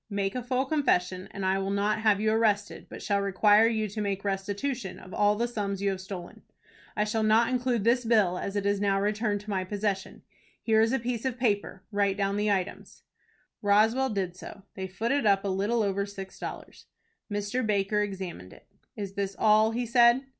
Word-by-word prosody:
Make 200 -1 -1
a 250 - -3
full 255 +2 -1
confession, 185 - 0
and 195 -2 -5
I 190 +1 +2
will 195 0 -2
not 205 +2 0
have 215 -2 +3
you 215 +1 +1
arrested, 210 -2 0
but - - -9
shall 200 -1 +1
require 205 +3 +4
you 220 -2 0
to 210 +2 -4
make 200 -1 -2
restitution 200 +4 -3
of 185 - -12
all 205 0 +3
the 235 +3 0
sums 200 -4 -3
you 200 0 +1
have 190 -1 -5
stolen. 185 -2 -8 0.6
I 210 - +3
shall 215 +1 -1
not 220 +2 +4
include 250 -3 0
this 240 +3 +3
bill, 210 -6 +2
as 200 - -4
it 200 -1 -1
is 200 0 +1
now 195 -1 +2
returned 210 0 0
to 210 0 -7
my 190 -2 0
possession. 200 0 -3 0.4
Here 220 -1 +3
is 225 +1 +3
a 265 - +2
piece 235 -1 -3
of 260 -2 -2
paper. 205 -5 -1
Write 200 -1 +1
down 200 0 0
the 210 +1 0
items." 195 -1 -3 0.6
Roswell 220 +6 +3
did 190 -4 -2
so. 195 +2 -11
They 190 -1 -5
footed 230 +6 0
up 195 0 +3
a - - 0
little 205 +5 0
over 200 0 -1
six 195 -1 -9
dollars. - - -8 0.4
Mr. 205 +5 -1
Baker 210 -1 +1
examined 190 - -5
it. - - -18 0.3
"Is 200 -2 -5
this 195 -1 -3
all?" 215 0 +4
he 240 +2 -2
said. 235 +2 +4
205 Hz, 205 wpm, -28 LUFS, 195-225 Hz, 0.6 s, require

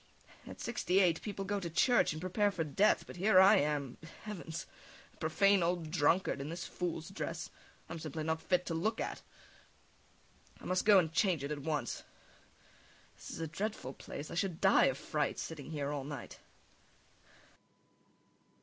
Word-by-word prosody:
At - - -9
sixty 195 -6 +1
eight 175 -4 +3
people 200 -2 -4
go 205 +1 -1
to 175 -3 -4
church 240 +9 +3
and 155 - -5
prepare 185 +4 +1
for 185 -5 -2
death, 190 +8 +3
but - - -10
here 190 +1 +5
I 190 +1 +8
am 145 -3 -1 0.2
heavens! 170 -6 -6 0.5
A - - -26
profane 195 +5 +3
old 170 -2 -1
drunkard 150 0 +2
in 140 - -5
this 170 +2 -5
fool's 170 -2 -4
dress 165 -3 -5 0.4
I'm 165 +1 -6
simply 155 0 -5
not 160 +1 -1
fit 180 -1 +1
to 165 - -3
look 180 +8 -1
at. - - -3 1.4
I - - -13
must 185 0 0
go 205 -2 +8
and 165 -4 +2
change 175 -5 +2
it 140 - -3
at 150 - -3
once.... 145 -5 -2 1.1
This - - -11
is - - -6
a - - -1
dreadful 170 -4 -4
place, 145 +2 -8
I - - -5
should 175 -1 -1
die 190 - +5
of 130 - +1
fright 150 0 -1
sitting 155 -3 -6
here 145 -2 -3
all 145 -2 -3
night. 140 -3 -7
165 Hz, 170 wpm, -33 LUFS, 155-190 Hz, 1.4 s, I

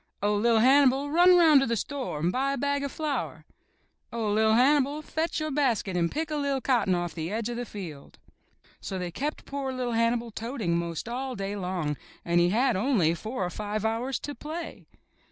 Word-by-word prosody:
'*0h, 205 0 +2
Li'r 230 0 +4
Hannibal, 275 +2 +4
run 355 +3 +6
'round 320 -5 +7
to 270 - +1
the 235 - 0
store 260 - -4
and 170 +3 +1
buy 270 +5 0
a - - -3
bag 285 +2 0
of 280 - -3
flour." 305 -3 -3 0.7
'*0h, 220 -3 -1
LVV 220 0 +4
Hannibal, 285 +3 +3
fetch 320 +2 -2
your 310 0 -2
basket 245 -9 0
and 170 -1 +1
pick 315 0 -3
a - - -1
li'r 280 -2 0
cotton 235 -8 +2
off 175 -1 -3
the 160 0 -4
edge 225 +2 -2
of 240 - -4
the 245 - -3
field." 170 -10 -9 0.6
So 190 - -5
they 180 -1 -4
kept 290 - -4
poor 275 -1 -4
little 250 -2 -3
Hannibal 230 0 +1
toting 225 -6 -2
'most 170 +2 -3
all 255 +2 -4
day 195 +1 -4
long, 180 -6 -2 0.3
and 170 0 +2
he 175 0 +4
had 240 +5 +2
only 190 - +2
four 215 +4 -4
or 175 - -4
five 210 +2 -3
hours 235 +4 -1
to 290 - -5
play. 320 +4 -7
235 Hz, 205 wpm, -27 LUFS, 195-280 Hz, 0.7 s, round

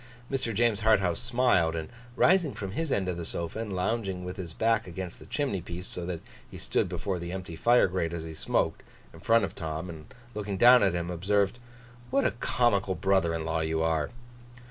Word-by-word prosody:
Mr. 130 -4 -1
James 115 -1 +2
Harthouse 100 -6 +3
smiled; 115 -10 +2
and 80 -1 -3 0.3
rising 175 -4 +4
from 100 -2 -5
his 160 +7 -2
end 95 -5 +1
of 90 -2 -2
the 85 - -4
sofa, 85 +5 -4
and 105 -4 -4
lounging 95 -1 -1
with 90 - -6
his 90 -4 -6
back 110 +3 +1
against 90 0 -6
the - - -13
chimney 135 -11 -1
piece, 85 +2 -7
so 90 -2 -6
that 85 -3 -4 0.3
he - - -9
stood - - 0
before 95 -2 -3
the 85 0 -5
empty 90 -3 -6
fire 120 +8 +4
grate 90 -3 -1
as 85 -1 -4
he 80 0 -7
smoked, 80 - 0 0.3
in - - -12
front 115 -2 +3
of 85 - -8
Tom 80 +2 -4
and 80 -2 -12 0.2
looking 105 -2 -3
down 125 +4 +8
at 95 -3 +3
him, 85 0 -2
observed: 100 +5 +1 0.5
'What 140 - +2
a - - +3
comical 115 -5 +1
brother 95 -4 +2
in 80 -1 -3
law 80 0 0
you 80 0 0
are! 80 -2 +1
95 Hz, 210 wpm, -28 LUFS, 85-110 Hz, 0.5 s, down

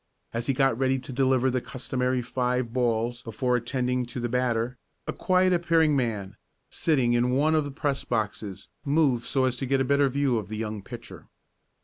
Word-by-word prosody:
As 115 +1 -2
he 135 - +2
got 135 -2 +3
ready 135 0 +2
to 130 0 -8
deliver 130 0 +2
the 130 0 0
customary 130 -1 -2
five 125 -1 -1
balls 120 -1 0
before 125 +2 -1
attending 125 +1 -1
to 120 - -6
the 120 - -1
batter 125 0 0 0.3
a - - -3
quiet 185 0 +2
appearing 165 -3 +3
man, 110 -7 -2 0.3
sitting 130 -7 +2
in 120 +1 +2
one 150 +3 +3
of 155 -2 +2
the - - -4
press 140 -1 -2
boxes, 105 -4 -3 0.2
moved 140 -5 +2
so 130 -2 +2
as 130 -1 0
to 135 - -3
get 135 +1 +2
a - - +3
better 140 +1 +3
view 135 -3 +1
of 100 -3 -8
the 110 - -4
young 110 -1 -4
pitcher. - - -10
125 Hz, 195 wpm, -26 LUFS, 120-135 Hz, 0.3 s, got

